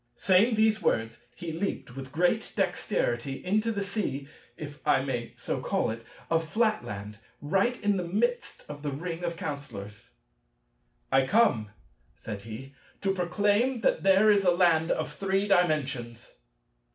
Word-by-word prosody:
Saying 200 +5 +4
these 220 0 +3
words, 115 +1 0
he 170 -3 -5
leaped 160 -7 -4
with 135 -1 -7
great 180 +8 +1
dexterity 140 - -1
into 215 +4 +1
the 200 -2 -2
sea 185 -10 -3 0.3
(if 145 -1 -8
I 135 -3 +3
may 120 -4 -4
so - - -3
call - - 0
it) 115 +1 -7 0.2
of 165 0 +1
Flatland, 155 - -1 0.2
right 195 +11 +1
in 205 -1 +2
the 180 - -1
midst 240 +7 -1
of 145 0 -8
the 150 - -2
ring 165 +5 -5
of 170 -1 -2
Counsellors. 105 -10 -7 1.0
"I 135 0 +4
come," 155 - +3 0.5
said 105 -3 -7
he, 115 +6 -9 0.3
"to 195 -1 +1
proclaim 205 +7 +1
that - - +2
there 195 +2 +5
is 200 -1 +3
a 180 - +4
land 170 -2 +3
of 155 -1 -1
Three 195 +2 0
Dimensions." 140 - 0
170 Hz, 150 wpm, -28 LUFS, 135-200 Hz, 1.0 s, there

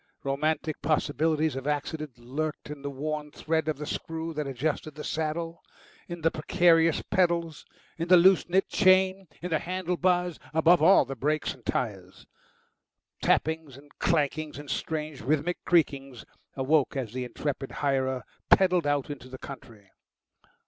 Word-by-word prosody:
Romantic 155 +3 -1
possibilities 155 0 +1
of 135 +1 -5
accident 150 -2 -3
lurked 150 +5 -4
in 150 -2 -8
the 140 - -4
worn 150 +2 -4
thread 160 +1 -1
of 155 - -1
the 150 - -5
screw 160 +1 -4
that 150 -2 -3
adjusted 145 +3 -3
the 150 - -7
saddle, 165 +2 -3 0.5
in 175 -1 -7
the 165 +1 +2
precarious 165 +1 +3
pedals, 170 -4 0 0.3
in 165 - -2
the 180 0 +8
loose 185 +1 +5
knit 190 +2 +2
chain, 190 -1 +3 0.2
in 180 - -4
the 160 - +2
handle 180 0 -2
bars, 180 -1 +1 0.2
above 165 +1 +5
all 180 +5 +7
in - - -14
the 135 - -5
brakes 150 +5 -1
and 125 -4 -17
tyres. 95 -6 -3 1.0
Tappings 160 -4 0
and 145 +1 -17
clankings 155 -2 0
and 145 -1 -7
strange 155 -3 -3
rhythmic 155 +7 -1
creakings 135 - +1 0.3
awoke 140 +2 +2
as 125 -5 -3
the 130 0 -3
intrepid 135 +2 -4
hirer 130 -2 -1 0.3
pedalled 180 -4 +4
out 145 0 0
into 130 -3 -9
the 130 - -8
country. 115 -8 -11
155 Hz, 155 wpm, -28 LUFS, 140-165 Hz, 1.0 s, the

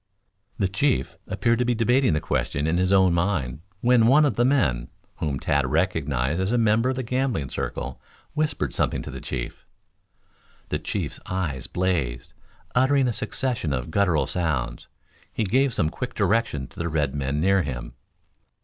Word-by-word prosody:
The 100 - +1
chief 120 +9 0
appeared 115 +5 +1
to 125 - +2
be 120 0 +1
debating 125 - +3
the 75 - +2
question 75 -1 -1
in 80 +2 +1
his 90 +1 +1
own 95 -2 +5
mind, 85 -7 -1 0.2
when 120 -2 +5
one 150 +5 +6
of 135 -8 +1
the 120 - +3
men, 75 - +2 0.3
whom 70 -4 -2
Tad 70 -1 +1
recognized 75 -2 0
as 95 +3 0
a 120 - +2
member 115 +2 +3
of 130 - 0
the 130 - -3
gambling 125 - -1
circle, - - -4 0.3
whispered 155 0 -1
something - - 0
to - - -7
the - - -7
chief. - - -5 1.1
The - - -1
chief's - - -3
eyes 85 -9 -2
blazed. 80 -10 -1 0.4
Uttering 130 +1 +3
a 120 - 0
succession 110 - -1
of 65 +4 -3
gutteral 90 -5 +2
sounds, 70 -9 -2 0.4
he 115 - -1
gave 130 +7 +2
some 80 -8 0
quick 125 -1 -5
directions 95 - 0
to - - -14
the 85 0 -1
red 75 -4 0
men 70 0 -1
near 95 +3 +3
him. 65 -7 -5
95 Hz, 170 wpm, -25 LUFS, 75-120 Hz, 1.1 s, one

